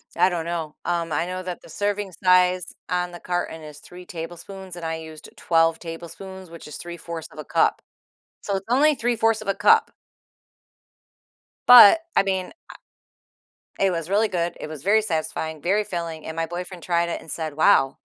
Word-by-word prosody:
I 185 - +4
don't 170 -2 -3
know. 165 -3 -4
Um, 170 -2 -1
I 160 +3 0
know 185 +1 -5
that 180 -1 -6
the - - -15
serving 205 +1 -2
size 180 -1 +3 0.2
on 180 0 -1
the 175 - -9
carton 175 -2 -3
is 150 -1 -10
3 180 +3 -12
tablespoons, 175 +3 -8
and 170 -1 -7
I 160 0 -2
used 160 -1 -10
12 165 -1 +2
tablespoons, 175 +2 -9
which 165 -2 -11
is 150 - -7
3/4 170 -2 -7
of 155 - -13
a - - -5
cup. - - +2 0.6
So, 200 - -2
it's 190 - -6
only 290 +5 +4
3/4 225 -3 +1
of 200 - -9
a 195 - +2
cup. 205 +1 +4 1.8
But, 245 +4 +10 0.2
I - - +5
mean, 190 -1 -1
I - - -15 1.3
it 195 -1 +4
was 165 0 -4
really 215 +2 +3
good, 175 -1 -2
it - - -6
was 155 -3 -8
very 215 +2 +4
satisfying, 160 -4 -3
very 200 +4 +2
filling, 170 -4 -5
and 160 0 -6
my 165 - 0
boyfriend 175 +1 -7
tried 170 -1 +1
it - - -4
and - - -10
said, 155 -3 -4
"Wow" 135 -3 +4
175 Hz, 185 wpm, -23 LUFS, 165-190 Hz, 1.8 s, But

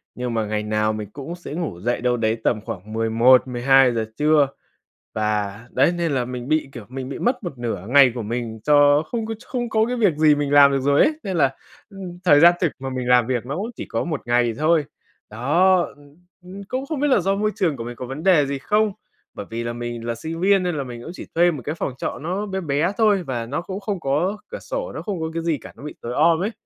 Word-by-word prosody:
nhưng 125 -1 -3
mà 110 -1 0
ngày 105 0 -2
nào 110 0 0
mình 105 -2 -6
cũng 145 +5 -7
sẽ 175 -4 -9
ngủ 160 - -4
dậy 120 +5 -1
đâu 125 0 +1
đấy 110 0 0
tầm 110 -3 +1
khoảng 105 +4 -7
11:00-12:00 120 +1 +4
trưa. 150 -1 +4 0.7
Và 105 -1 -1
đấy, 135 +7 +3
nên 170 -3 -1
là 125 -2 0
mình 125 +1 -6
bị, 155 -3 +1
kiểu, 120 -5 -9
mình 130 +1 -6
bị 140 - -6
mất 250 0 0
một 165 -8 -6
nửa 110 -6 -4
ngày 130 -1 +6
của 120 - -4
mình 115 0 -4
cho 145 0 +5
không 230 -2 -2
có 225 - -3
ch 225 - -16
không 240 -2 -3
có 220 0 +2
cái 250 - -2
việc 200 -10 +2
gì 155 -1 +5
mình 145 -1 -2
làm 140 -1 +8
được 135 - +1
rồi 140 +2 +3
ấy, 315 - +3
nên 190 -3 -3
là, 135 -3 +2 0.3
ưm, 185 -3 -9
thời 145 -4 +6
gian 175 +2 +8
thực 175 -5 +1
mà 135 0 -5
mình 130 -1 -4
làm 125 -2 +5
việc 125 -2 -2
nó 140 +5 -4
cũng 215 +5 -3
chỉ - - -6
có - - -2
1 155 -8 -3
ngày 120 -1 +2
thôi. 155 -1 +3 0.5
Đó, 170 - +3 0.2
ưm, 145 +1 -20 0.3
ưm, 195 +2 -9
cũng 265 +2 -3
không 305 -3 -3
biết 295 - +2
là 260 - +4
do 195 +2 +1
môi 210 +1 0
trường 170 -8 0
của 115 - -6
mình 120 0 -7
có 125 - -6
vấn 135 +5 -6
đề 175 -7 +4
gì 140 0 -3
không. 210 +7 +1 0.4
Bởi - - -7
vì 115 +1 -4
là 120 - -3
mình 120 -1 -6
là 120 - -1
sinh 160 +8 -6
viên 195 0 +4
nên 175 -2 -1
là 140 - -2
mình 120 -2 -8
cũng 165 - -8
chỉ - - -9
thuê 175 +1 +4
một 145 -7 -6
cái 150 - -3
phòng 140 - -3
trọ - - -4
nó 185 +6 -2
bé 190 -1 -3
bé 160 +3 0
thôi 210 -4 +3
và 120 -6 -4
nó 140 +7 -3
cũng 190 +2 -6
không 200 -2 -3
có 160 +9 0
cửa - - -6
sổ, - - -5
nó - - -5
không 200 -6 -4
có 160 0 -3
cái 165 - -2
gì 165 -3 0
cả, - - -12
nó - - -14
bị 150 - -7
tối 120 - -5
om 165 +3 +3
ấy 210 - -1
145 Hz, 265 wpm, -22 LUFS, 120-180 Hz, 0.7 s, làm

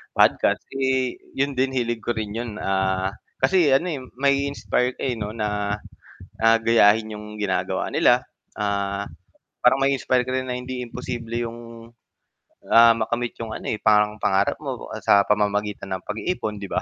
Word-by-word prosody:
podcast, - - +3
eh, 130 -2 0 0.2
yun 140 +1 0
din 130 +1 +1
hilig 120 -2 -1
ko 120 - -1
rin 105 -2 -3
'yon, 115 0 -4
ah, 95 0 0 0.3
kasi 155 +4 +3
ano, 140 +7 +3
eh, 145 - -3 0.2
mai-inspire 140 -2 +1
ka, - - -12
eh, 130 - 0
‘no, 105 -1 -3
na, 105 -1 -1 0.6
ah, 115 0 +5
gayahin 110 -1 +4
'yong 105 0 -9
ginagawa 95 -2 -1
nila, - - +4 0.3
ah, 100 -1 -1 0.6
parang 125 +2 +4
ma-inspire 130 -2 +1
ka 130 - -4
rin 130 0 -1
na 125 - -2
hindi 125 0 -5
imposible 120 -1 -6
'yong, 115 0 -9 0.8
ah, 115 0 +8
makamit 120 +2 -2
'yong 115 -1 -5
ano, - - -7
eh, 110 - -1
pang 105 0 +3
pangarap 95 -1 +1
mo - - -5 0.2
sa 100 - +6
pamamagitan 105 -2 0
ng 95 - -4
pag-iipon, 110 - -3
'di 100 -1 -7
ba? - - 0
115 Hz, 160 wpm, -23 LUFS, 105-125 Hz, 0.8 s, ah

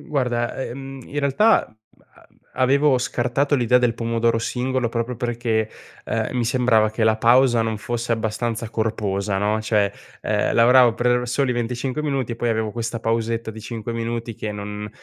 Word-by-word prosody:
Guarda, 120 -4 -1
ehm, 135 +2 -7
in 145 - -5
realtà 145 +11 +3 0.9
a - - -2
avevo 140 +1 +4
scartato 125 +4 0
l'idea 125 -1 +3
del 120 -2 +1
pomodoro 115 0 0
singolo 125 +1 -1
proprio 115 +1 -3
perché, 115 -2 -1 0.4
ehm, 115 +3 -2
mi 120 - +1
sembrava 115 -3 +3
che 110 +1 -3
la 110 0 +3
pausa 120 +1 +4
non 110 -1 -2
fosse 120 +2 -4
abbastanza 115 +1 -2
corposa, 105 -3 -1
no, 105 +2 0
cioè, 105 -2 +1 0.3
ehm, - - 0
lavoravo 120 0 +6
per 125 +1 +1
soli 125 +1 +1
25 125 +4 -2
minuti 135 -5 -1
e 115 - -6
poi 120 - -1
avevo 110 -1 0
questa 115 0 -3
pausetta 115 0 -1
di 110 - -10
5 115 0 -5
minuti 115 0 -3
che 105 - -5
non 105 0 -6
115 Hz, 165 wpm, -22 LUFS, 110-125 Hz, 0.9 s, lavoravo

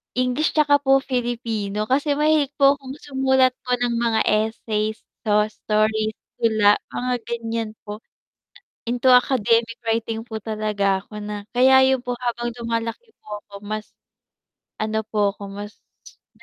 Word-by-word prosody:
English 255 +4 +1
tsaka 300 -2 +5
po 270 0 +5
Filipino 230 -5 -2
kasi 285 +3 +2
mahilig 300 -2 +3
po 275 0 +6
kung 265 -1 -9
sumulat 265 -2 +2
po 250 -1 +1
ng 240 -1 0
mga 230 -1 +1
essays, 215 0 0 0.3
so 210 0 +4
stories, 215 0 0 0.2
tula, 215 -2 +4 0.2
mga 250 0 -2
ganyan 230 -1 -3 0.2
po. 210 +1 -6 0.9
Into 245 +2 +2
academic 230 -2 +3
writing 225 0 -1
po 220 -2 -5
talaga 210 -3 0
ako 210 +1 -9
na, 205 -1 -6
kaya 265 +1 +6
yun 260 - -3
po 245 0 -2
habang 240 -1 -2
lumalaki 230 - -3
po 210 -1 -6
ako 205 - -31
mas 215 0 -5 0.9
ano 220 0 -1
po 210 -2 +1
ako, 200 - -9
mas 205 +1 -8 0.6
na - - -20
230 Hz, 145 wpm, -22 LUFS, 215-255 Hz, 0.9 s, po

